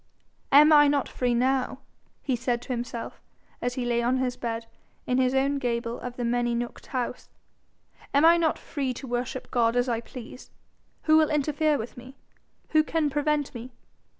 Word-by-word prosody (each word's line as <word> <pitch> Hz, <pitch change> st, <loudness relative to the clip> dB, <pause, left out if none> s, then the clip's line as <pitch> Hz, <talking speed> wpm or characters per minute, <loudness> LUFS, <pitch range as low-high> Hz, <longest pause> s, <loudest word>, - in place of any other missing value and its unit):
'Am 300 Hz, +3 st, +8 dB
I 295 Hz, -1 st, +7 dB
not 285 Hz, -1 st, +1 dB
free 245 Hz, -1 st, -1 dB
now?' 260 Hz, +1 st, +1 dB, 0.5 s
he 265 Hz, -, 0 dB
said 240 Hz, 0 st, -1 dB
to -, -, -15 dB
himself, 235 Hz, -1 st, -5 dB, 0.4 s
as 245 Hz, 0 st, -2 dB
he 255 Hz, -, -2 dB
lay 235 Hz, -1 st, +1 dB
on 245 Hz, +2 st, +1 dB
his 255 Hz, -1 st, -1 dB
bed 230 Hz, -1 st, -4 dB, 0.4 s
in 250 Hz, +1 st, +1 dB
his 255 Hz, 0 st, +2 dB
own 275 Hz, +1 st, +1 dB
gable 235 Hz, -1 st, -2 dB
of 250 Hz, -1 st, -6 dB
the 245 Hz, -, -3 dB
many 240 Hz, 0 st, 0 dB
nooked 240 Hz, 0 st, -5 dB
house; 250 Hz, -1 st, -4 dB, 0.8 s
'Am 285 Hz, +3 st, +4 dB
I 335 Hz, +1 st, +8 dB
not 325 Hz, -2 st, +1 dB
free 265 Hz, -4 st, -3 dB
to 270 Hz, -, -8 dB
worship 250 Hz, +1 st, -4 dB
God 235 Hz, -2 st, +2 dB
as 245 Hz, +1 st, +2 dB
I 230 Hz, -2 st, -1 dB
please? 250 Hz, +1 st, -11 dB, 0.5 s
Who 310 Hz, 0 st, +5 dB
will 315 Hz, -1 st, +4 dB
interfere 300 Hz, +1 st, +1 dB
with 230 Hz, +1 st, -7 dB
me? 255 Hz, +2 st, -11 dB, 0.5 s
Who 310 Hz, -1 st, +4 dB
can 310 Hz, -2 st, 0 dB
prevent 295 Hz, 0 st, 0 dB
me? 245 Hz, +1 st, -8 dB
255 Hz, 180 wpm, -26 LUFS, 240-285 Hz, 0.8 s, Am